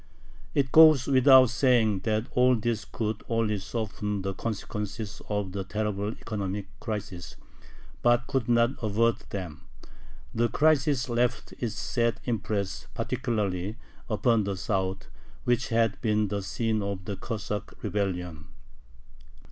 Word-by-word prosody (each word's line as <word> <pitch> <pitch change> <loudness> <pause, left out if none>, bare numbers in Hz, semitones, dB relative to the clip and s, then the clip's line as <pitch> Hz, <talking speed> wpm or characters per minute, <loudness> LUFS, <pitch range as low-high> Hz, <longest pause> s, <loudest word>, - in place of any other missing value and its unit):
It 135 -2 +1
goes 155 -5 +8
without 130 -2 +6
saying 115 -5 +3
that 110 0 +1
all 125 0 +4
this 115 -1 -2
could 110 -1 -3
only 115 -3 +1
soften 105 -1 -3
the 95 0 -2
consequences 105 0 -5
of 105 -3 -1
the 100 0 -3
terrible 105 +1 -2
economic 100 -4 -4
crisis, 100 -6 -5 0.7
but 120 0 +3
could 130 -3 -1
not 120 +1 +4
avert 110 +1 +1
them. 90 -6 -6 0.7
The 120 +1 +1
crisis 145 -3 +2
left 120 0 0
its 120 -4 -2
sad 115 -1 0
impress 105 -4 -2
particularly 110 -6 -2 0.3
upon 115 0 +2
the 100 -1 -3
South, 95 -1 -2 0.4
which 120 +1 +1
had 115 -3 +1
been 105 -2 +1
the 100 0 -2
scene 110 +3 -1
of 100 -2 -4
the 100 - -3
Cossack 105 -1 -5
rebellion. 90 -6 -2
110 Hz, 125 wpm, -27 LUFS, 100-120 Hz, 0.7 s, goes